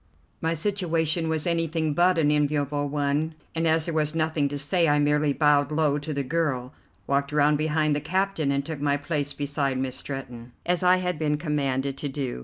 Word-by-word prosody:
My 165 +1 0
situation 165 -3 0
was 160 -1 0
anything 165 -2 0
but 175 +3 +3
an 150 -2 +3
enviable 145 -1 0
one, 145 +2 -1 0.2
and 165 0 0
as 160 0 +2
there 170 - -3
was 155 0 0
nothing 155 -3 0
to 145 - -4
say 165 +4 +2
I 145 -1 +3
merely 150 0 +2
bowed 145 -1 +3
low 150 -2 +1
to 150 +2 -6
the 140 -1 -1
girl, 135 -4 -1 0.3
walked 140 0 0
around 150 0 +3
behind 155 0 +1
the 145 - -2
captain, 180 -2 0
and 140 0 -1
took 160 -3 -5
my 145 0 +2
place 145 -1 -2
beside 145 -2 -1
Miss 130 -1 -2
Stretton, 125 -3 -7
as 175 +1 +1
I 180 0 +5
had 180 -3 -2
been 150 -1 +1
commanded 140 -3 -1
to 145 - -3
do. 135 - -4
150 Hz, 200 wpm, -25 LUFS, 145-160 Hz, 0.3 s, I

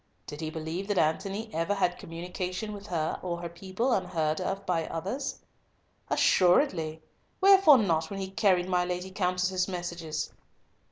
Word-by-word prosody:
Did 150 +2 -8
he 160 - -2
believe 160 +4 -4
that 205 -2 -1
Antony 195 +8 0
ever 165 +5 0
had 180 -2 0
communication 180 +4 -5
with 205 0 -9
her 160 -4 -1
or 175 -2 -3
her 170 0 -5
people 190 +8 -2
unheard 165 -5 0 0.2
by 165 -3 0
others? 200 - -3 0.7
"Assuredly! 175 - +3 0.4
Wherefore 385 -7 +8
not, 170 -8 +1
when 200 -1 -5
he 190 0 -4
carried 185 -3 +2
my 180 -1 +2
Lady 180 +1 -4
Countess's 185 -1 0
messages?" 170 -4 -4
180 Hz, 145 wpm, -29 LUFS, 165-195 Hz, 0.7 s, Wherefore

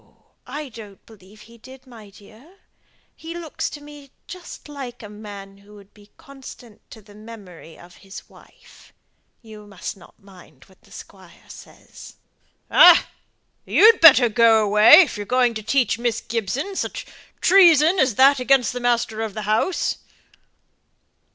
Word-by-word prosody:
I 295 -1 -8
don't 215 -4 -15
believe 210 -1 -20
he 230 +2 -19
did, 260 +3 -17
my 225 -5 -16
dear. 220 - -20 0.6
He 330 +1 -11
looks 335 -3 -6
to 295 - -12
me 290 -1 -15 0.2
just 360 -3 -13
like 265 -5 -10
a 210 - -11
man 200 -2 -13
who 205 +1 -20
would 200 -1 -19
be 205 -1 -22
constant 260 -5 -15
to 220 - -15
the 205 0 -20
memory 205 -7 -15
of 175 +1 -18
his 195 0 -14
wife. - - -22 0.5
You 215 -2 -15
must 200 +1 -9
not 180 - -21
mind 180 -9 -20
what 190 - -27
the - - -26
squire 185 -3 -16
says." - - -16 0.6
"Ah! - - +5 0.5
you'd 445 +2 +3
better 275 -7 +7
go 225 -1 +2
away, 210 - +6
if 325 - -3
you're 205 -1 -8
going 250 0 0
to 220 - -7
teach 240 0 -1
Miss 235 -1 -3
Gibson 235 - -6
such - - -6 0.3
treason 345 -2 +3
as 255 -5 0
that 270 +3 +3
against 255 -1 0
the 250 - -6
master 235 -2 -2
of 220 -2 -6
the 215 - -6
house." 215 - -2
225 Hz, 155 wpm, -20 LUFS, 205-275 Hz, 0.6 s, better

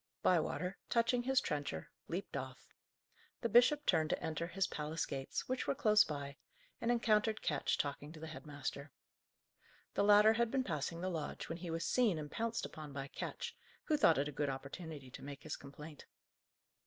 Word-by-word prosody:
Bywater, 180 +2 +1
touching 235 +1 +3
his 265 +2 +3
trencher, 145 - -3 0.2
leaped - - -4
off. - - -6 0.7
The - - 0
bishop 250 +7 +6
turned 160 -3 +3
to - - +1
enter 160 +1 -2
his 195 +2 0
palace 155 -1 -2
gates, 135 -1 -4
which 255 0 -1
were - - +1
close 215 -7 +6
by, 140 -2 -5 0.4
and 230 - 0
encountered 220 -2 +2
Ketch 145 -3 +1
talking 145 +1 -3
to 160 - -10
the 160 - -6
head 155 -1 -8
master. 145 0 -5 1.0
The - - +2
latter 210 +1 +7
had 235 0 +2
been 265 +1 +1
passing 165 - -2
the 185 - -1
lodge, 160 -4 -4
when 165 - -4
he 175 0 -5
was 165 0 -2
seen 230 -9 +3
and 150 -1 -5
pounced 230 0 -1
upon 150 -2 -8
by 135 0 -5
Ketch, - - -5 0.3
who 310 - +2
thought 215 - +5
it 140 +1 +1
a - - -4
good 145 0 -1
opportunity 140 +1 -6
to - - -9
make 140 0 -8
his - - -3
complaint. 145 +2 -11
165 Hz, 185 wpm, -36 LUFS, 145-220 Hz, 1.0 s, latter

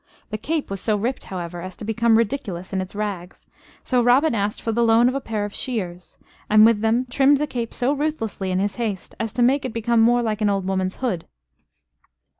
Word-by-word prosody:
The 215 - -2
cape 310 -1 -2
was 195 -1 -3
so 215 - +1
ripped, 240 +6 -3
however, 175 -2 -6
as 185 +1 -7
to - - -8
become 225 +1 +3
ridiculous 205 -6 -2
in 190 - 0
its 185 +2 -8
rags, 200 -4 -5 0.4
so 250 -2 +2
Robin 250 +6 +4
asked 205 -1 -1
for 225 - -2
the 235 +2 0
loan 230 +1 +5
of 255 - +1
a 275 - -2
pair 215 -4 -3
of 205 - -7
shears, 185 -8 -5 0.3
and 215 0 +7
with 225 -2 +4
them 225 +3 +2
trimmed 275 +3 +4
the 300 - 0
cape 235 -5 -4
so 250 +3 0
ruthlessly 275 -10 -2
in 185 - 0
his 195 +1 -1
haste 215 -6 -3
as 225 -1 -2
to 240 0 +1
make 270 +3 +3
it 255 - -4
become 230 0 +2
more 240 +1 +4
like 220 -1 -2
an 210 - +3
old 195 -2 0
woman's 190 0 -1
hood. 185 -9 -2
225 Hz, 225 wpm, -22 LUFS, 195-245 Hz, 0.4 s, and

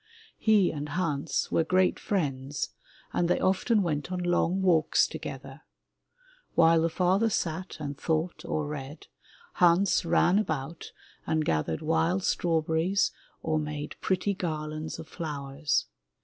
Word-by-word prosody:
He 210 -4 +4
and 150 -1 -5
Hans 150 -5 -1
were 165 - +3
great 185 +2 +2
friends 140 -7 -2 0.4
and 175 - +1
they 180 - +2
often 200 +3 +2
went 155 0 -2
on 185 - -1
long 175 +2 +1
walks 165 -4 +4
together. - - -7 0.9
While 165 -1 +5
the 165 - +2
father 190 +6 +2
sat 180 -2 -2
and 145 -2 -4
thought 160 +4 -2
or 155 - -2
read, 145 0 -7 0.6
Hans 180 +3 +4
ran 175 +3 +3
about 155 -5 -4 0.4
and 155 -1 +1
gathered 80 0 -1
wild 165 +4 +1
strawberries 165 +3 +1 0.3
or 155 -1 +1
made 150 -1 -5
pretty 190 +2 0
garlands 155 -3 -4
of 160 - -9
flowers. 145 -3 -2
165 Hz, 130 wpm, -28 LUFS, 150-185 Hz, 0.9 s, While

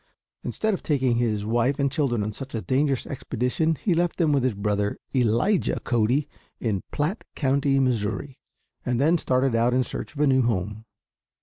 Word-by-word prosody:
Instead 220 -1 -1
of 190 - -3
taking 130 -5 +1
his 110 -4 0
wife 120 +5 +1
and 140 -1 +1
children 130 -8 0
on 105 - -2
such 135 +4 -8
a 110 - -2
dangerous 135 +4 +1
expedition 135 +4 -1
he 180 +5 0
left 175 0 0
them 160 -4 +2
with 140 -3 +2
his 130 -5 +1
brother, 105 0 -1 0.2
Elijah 125 - +2
Cody, 120 +4 +1 0.3
in 105 -5 -1
Platt 160 +9 -2
County, 135 0 +2
Missouri, 125 +1 -1 0.4
and 125 -1 0
then 160 +5 +3
started 130 -2 +1
out 120 +2 +2
in 130 - +3
search 135 - -6
of - - -8
a - - +5
new 130 -2 +4
home. 110 -1 -1
130 Hz, 180 wpm, -25 LUFS, 115-145 Hz, 0.4 s, a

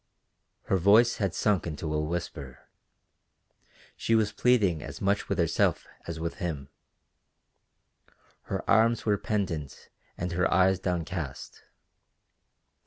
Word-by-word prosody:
Her 95 - +1
voice 105 +6 +5
had 100 -5 -1
sunk 105 -5 +1
into 75 0 -4
a 75 - 0
whisper: 75 -5 -5 1.3
she 115 - +1
was 110 -2 +2
pleading 105 -11 +2
as 70 -2 -8
much 100 +1 0
with - - 0
herself - - +1 0.2
as 85 -1 -5
with 85 0 -4
him. 75 -7 -4 1.8
Her - - -4
arms 115 +1 +3
were 105 -3 +2
pendant 85 -10 -3 0.3
and 90 - -3
her 90 +2 +1
eyes 95 +1 +4
downcast. 85 -5 -4
90 Hz, 115 wpm, -28 LUFS, 80-100 Hz, 1.8 s, voice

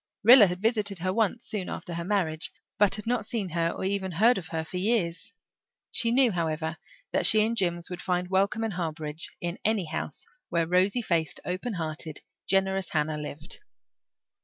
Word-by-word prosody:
Rilla 235 -1 +10
had 180 +2 -5
visited 210 -3 +1
her 185 +2 -1
once 225 +2 0
soon 205 -5 -3
after 175 - -5
her 170 0 -3
marriage, 170 -5 0 0.3
but 200 -1 +5
had 210 - -5
not 240 -1 0
seen 215 -6 -2
her 165 0 +1
or - - -5
even 190 -1 -1
heard 225 +6 +4
of 175 - -10
her 160 -2 -3
for 180 - -6
years; 190 -2 0 0.6
she 230 - +1
knew, 250 0 +4
however, 160 -2 -2 0.3
that - - +3
she 215 -1 +5
and 230 +1 -1
Jims 175 -4 -1
would 180 - -5
find 180 -1 -1
welcome 200 +4 +2
and 220 -2 -2
harbourage 160 -2 -3
in 175 +1 -3
any 215 -4 +1
house 155 -2 -4 0.2
where 170 -1 +1
rosy 185 +7 +2
faced, 165 -6 0
open 185 +7 -3
hearted, 155 -2 -5 0.3
generous 195 -1 +1
Hannah 150 -1 -1
lived. 150 +3 -6
185 Hz, 185 wpm, -27 LUFS, 165-210 Hz, 0.6 s, Rilla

